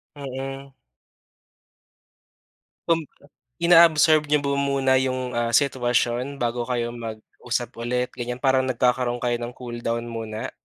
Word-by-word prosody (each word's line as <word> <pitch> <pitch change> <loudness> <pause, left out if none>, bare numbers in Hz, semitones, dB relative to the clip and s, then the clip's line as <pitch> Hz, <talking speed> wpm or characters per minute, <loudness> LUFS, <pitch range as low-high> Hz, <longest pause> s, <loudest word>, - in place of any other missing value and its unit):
Mm. 135 0 -6 2.2
Kum 165 -1 +3 0.6
inaabsorb 165 -2 +6
niyo 150 0 +3
ba 140 0 0
muna 135 -1 +2
yung, 130 0 -1 0.2
ah, 120 0 0
sitwasyon 125 -1 +1
bago 120 0 -1
kayo 120 -1 -1
mag-usap 115 +1 -5
ulit, 125 +2 -1
ganyan? 125 +1 -4
Parang 130 -1 +3
nagkakaroon 125 0 0
kayo 120 -1 +1
ng 120 +1 -5
cool 120 -2 -7
down 115 0 -2
muna? 110 -1 -5
125 Hz, 120 wpm, -24 LUFS, 120-135 Hz, 2.2 s, inaabsorb